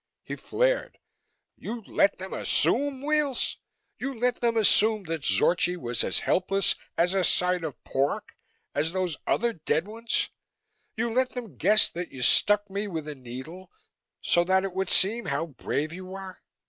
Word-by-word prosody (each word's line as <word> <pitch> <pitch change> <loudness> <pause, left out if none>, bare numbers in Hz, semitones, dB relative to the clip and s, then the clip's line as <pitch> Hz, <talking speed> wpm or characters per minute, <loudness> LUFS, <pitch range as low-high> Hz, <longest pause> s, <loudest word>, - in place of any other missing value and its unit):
He - - -6
flared, - - -1 0.6
"You 230 0 -7
let 200 0 +1
them 190 +1 -7
assume, 275 +1 +2
Weels? 300 -3 0 0.4
You 275 -1 -4
let 245 +1 -1
them 235 -1 +1
assume 215 0 +4
that 165 -3 -4
Zorchi 180 +4 +2
was 120 -7 -2
as - - 0
helpless 195 +1 +1 0.2
a 180 +2 +2
side 180 0 +1
of 155 -5 -7
pork 135 +2 -2 0.4
as 155 +4 -1
those 185 -4 -1
other 235 0 +1
dead 160 0 -1
ones 225 +2 -2 0.7
you 230 0 -1
let 255 +1 +1
them 245 -3 -7
guess 215 0 +4
that 175 +1 -6
you 125 - -5
stuck 205 +9 +4
me 200 +2 -4
with 160 -5 -5
a 150 - -4
needle, 135 +8 -10 0.5
so 175 - +3
that 190 +1 +2
it 195 -2 -4
would 190 -1 -2
seem 220 +4 +5
how 150 -1 -1
brave 150 0 -4
you 185 +1 -8
were? 190 -1 -9
190 Hz, 160 wpm, -26 LUFS, 170-225 Hz, 0.7 s, seem